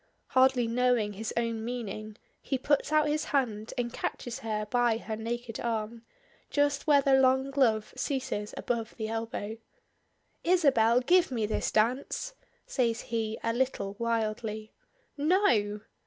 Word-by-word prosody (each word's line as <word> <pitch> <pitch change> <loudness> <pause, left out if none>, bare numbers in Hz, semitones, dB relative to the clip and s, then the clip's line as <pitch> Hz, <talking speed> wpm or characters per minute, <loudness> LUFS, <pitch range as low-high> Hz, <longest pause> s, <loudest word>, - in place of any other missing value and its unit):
Hardly 260 -1 +4
knowing 235 -2 +1
his 220 +2 -4
own 230 -1 -1
meaning, 215 -3 -5 0.2
he 270 - -1
puts 285 +3 +1
out 305 -1 +4
his 300 +1 0
hand 225 -6 -1
and 240 -1 -2
catches 240 -2 -4
her 215 -1 -2
by 240 0 +2
her 225 -1 -5
naked 230 +1 -4
arm, 225 0 -3 0.5
just 285 0 +1
where 285 -2 +5
the 275 - +3
long 265 +1 +4
glove 230 -6 +2
ceases 255 -7 -2
above 230 -2 -3
the 220 -2 -3
elbow. 225 -1 -4 0.9
"Isabel, 265 -10 +4
give 360 +7 +4
me 230 -5 -1
this 215 - -1
dance," 255 - 0 0.3
says 230 -4 0
he 220 -1 -1
a 230 - +1
little 230 -6 -1
wildly. 220 -1 -2 0.5
"_No! 240 - +2
235 Hz, 140 wpm, -29 LUFS, 220-265 Hz, 0.9 s, where